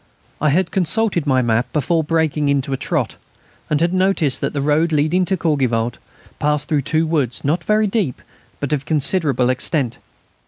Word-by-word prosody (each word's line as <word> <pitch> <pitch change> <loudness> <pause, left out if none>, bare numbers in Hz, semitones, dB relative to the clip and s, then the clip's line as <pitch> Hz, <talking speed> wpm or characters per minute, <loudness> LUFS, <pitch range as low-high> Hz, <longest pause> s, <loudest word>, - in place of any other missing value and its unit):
I 150 - +3
had 170 +4 +1
consulted 190 -2 0
my 130 -2 +3
map 115 +1 0
before 160 +3 +1
breaking 155 -2 0
into 140 -1 0
a - - +2
trot, - - -2 0.5
and 150 - +1
had 170 +2 +1
noticed 185 -7 +1
that - - -1
the 145 - -3
road 150 +4 +2
leading 155 +5 +2
to 190 +1 0
Courgivault 125 -8 0 0.4
passed 150 0 0
through 150 -2 +2
two 155 +4 0
woods, 145 -7 -1
not 155 +4 0
very 215 +4 +2
deep, 195 - -1 0.4
but 145 +1 -2
of 135 -2 -2
considerable 145 -3 +1
extent. 130 -1 0
150 Hz, 170 wpm, -19 LUFS, 135-170 Hz, 0.5 s, I